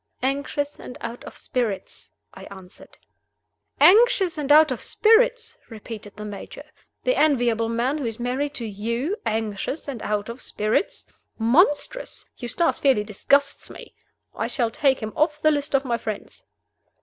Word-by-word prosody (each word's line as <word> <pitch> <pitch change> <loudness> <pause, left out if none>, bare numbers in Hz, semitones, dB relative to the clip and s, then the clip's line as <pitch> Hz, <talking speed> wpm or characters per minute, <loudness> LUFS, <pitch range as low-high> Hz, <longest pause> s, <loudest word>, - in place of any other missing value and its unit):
"Anxious 285 +2 -2
and 250 - -9
out 235 +1 -7
of - - -10
spirits." 235 -6 -3 0.2
I - - -11
answered. 190 -2 -13 0.8
"Anxious 400 -3 +5
and 295 -2 -2
out 310 +1 +7
of - - -3
spirits!" 460 +1 +3
repeated 220 -2 -9
the 210 0 -7
Major. 205 -1 -8 0.4
"The - - +2
enviable 240 -6 +2
man 245 +6 0
who 265 - -2
is 225 0 -5
married 265 +4 -2
to 235 - -4
You 235 - -2
anxious 220 +6 -3
and 260 -6 -5
out 210 0 -2
of 235 +2 -8
spirits? 215 - -1 0.3
Monstrous! 295 - +2
Eustace 275 +7 0
fairly 265 -7 +3
disgusts 275 +7 +1
me. - - -11 0.4
I - - -2
shall 235 -4 -1
take 270 +1 +2
him 215 0 -5
off 305 -1 +1
the 310 - +4
list 285 -1 -1
of 275 0 +1
my 235 -2 -1
friends." 215 -2 -7
255 Hz, 150 wpm, -24 LUFS, 225-300 Hz, 0.8 s, out